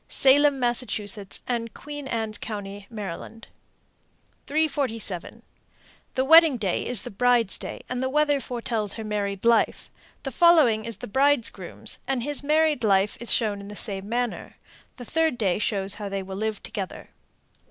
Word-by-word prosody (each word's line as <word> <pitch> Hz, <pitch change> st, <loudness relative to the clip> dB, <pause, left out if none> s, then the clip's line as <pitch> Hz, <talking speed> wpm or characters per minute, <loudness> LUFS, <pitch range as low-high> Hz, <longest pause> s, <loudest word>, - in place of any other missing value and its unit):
Salem, 280 Hz, +1 st, +5 dB
Mass., 240 Hz, 0 st, +1 dB, 0.7 s
and 230 Hz, -2 st, -3 dB
Queen 290 Hz, -1 st, -8 dB
Anne 225 Hz, -3 st, -2 dB
Co., 215 Hz, 0 st, -4 dB
Md. 205 Hz, +1 st, -8 dB, 1.0 s
347. 275 Hz, -, -1 dB, 0.7 s
The 260 Hz, -1 st, +1 dB
wedding 320 Hz, -2 st, +7 dB
day 195 Hz, -6 st, -1 dB
is 245 Hz, -5 st, +4 dB
the -, -, -7 dB
bride's 240 Hz, -1 st, +2 dB
day, -, -, -6 dB
and 250 Hz, 0 st, -3 dB
the 260 Hz, -, 0 dB
weather 295 Hz, 0 st, +2 dB
foretells 230 Hz, -5 st, -2 dB
her 225 Hz, -, -6 dB
married 205 Hz, -1 st, -3 dB
life. 235 Hz, -1 st, +2 dB, 0.3 s
The 270 Hz, -, -4 dB
following 275 Hz, -9 st, +5 dB
is 230 Hz, -3 st, -3 dB
the -, -, -8 dB
bridegroom's, 270 Hz, +1 st, 0 dB
and 265 Hz, -3 st, -1 dB
his 290 Hz, +1 st, -1 dB
married 305 Hz, -2 st, +2 dB
life 200 Hz, -1 st, +3 dB
is 235 Hz, -, 0 dB
shown 210 Hz, -4 st, +1 dB
in 200 Hz, -, -10 dB
the 205 Hz, -, -9 dB
same 200 Hz, -1 st, -3 dB
manner. 240 Hz, 0 st, -3 dB, 0.4 s
The 245 Hz, -, -8 dB
third 320 Hz, -1 st, +1 dB
day 200 Hz, -5 st, 0 dB
shows 200 Hz, -2 st, 0 dB
how 205 Hz, -1 st, -6 dB
they 195 Hz, 0 st, -3 dB
will 190 Hz, 0 st, -7 dB
live 215 Hz, 0 st, -3 dB
together. 195 Hz, -3 st, -6 dB
230 Hz, 155 wpm, -25 LUFS, 205-270 Hz, 1.0 s, wedding